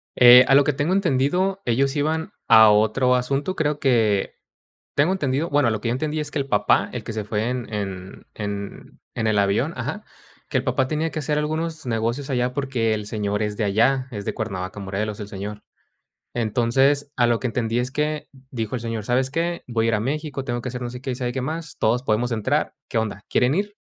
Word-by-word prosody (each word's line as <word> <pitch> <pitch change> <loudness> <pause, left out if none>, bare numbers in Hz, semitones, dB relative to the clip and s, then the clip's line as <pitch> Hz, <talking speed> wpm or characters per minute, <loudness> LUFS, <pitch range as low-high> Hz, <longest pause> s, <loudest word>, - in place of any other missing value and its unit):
Eh, 125 +1 +9
a - - +4
lo 140 +1 +7
que 150 - +1
tengo 145 +6 0
entendido, 185 +2 +1
ellos 135 +3 +1
iban 155 +2 -1 0.2
a 110 -1 +8
otro 110 +5 +3
asunto. 135 +8 -1
Creo 150 -3 0
que, 110 -8 +2 0.6
tengo 150 +6 +3
entendido 150 -3 -1
bueno, 140 -4 +3
lo 110 - -2
que 115 - -2
yo - - +1
entendí 150 +4 -2
es 150 -1 -4
que 150 - -3
el 140 - -1
papá, 105 -4 +2
el 125 - -4
que - - -5
se 110 -1 -3
fue 105 +2 -1
en 125 -3 -4
en 95 -3 -5
en 100 -1 -6
en 110 - -1
el 110 -1 +2
avión, 100 0 +1
ajá, - - -4 0.4
que - - +1
el - - -3
papá 130 - +1
tenía 155 +2 -1
que 155 - -5
hacer 150 +1 0
algunos 155 +1 -2
negocios 115 +4 -1
allá 125 -1 0
porque 125 -5 0
el 105 -1 -4
señor 105 -1 -2
es 105 -1 -2
de 110 - -1
allá. 120 +6 +2
Es 100 -2 -5
de - - -3
Cuernavaca, 95 +1 -4
Morelos, 100 +2 -3
el 105 - -6
señor. 105 +1 -6 0.7
Entonces, 130 +5 +1
a 120 - +3
lo 120 -1 +2
que 130 - -2
entendí 115 0 -1
es 125 +1 -1
que 150 +1 -2 0.2
dijo 115 -1 -3
el 120 - -4
señor: 115 -2 -4
"¿Sabes 130 +3 +1
qué? 170 +3 -2
Voy 115 -2 0
a - - +1
ir - - +1
a - - 0
México. 140 +2 -3
Tengo 120 -2 -3
que 130 - -4
hacer 125 0 -6
no 120 - -3
sé 125 +1 -8
qué 135 - -3
y - - -3
sabe 125 -1 -2
qué 130 - -3
más. 160 +3 -5
Todos 120 +3 +2
podemos 120 0 0
entrar, 110 -2 0 0.2
¿qué - - -2
onda?, 105 -2 -2
¿quieren 125 +4 +2
ir?". 205 +2 -2
125 Hz, 225 wpm, -23 LUFS, 110-145 Hz, 0.7 s, Eh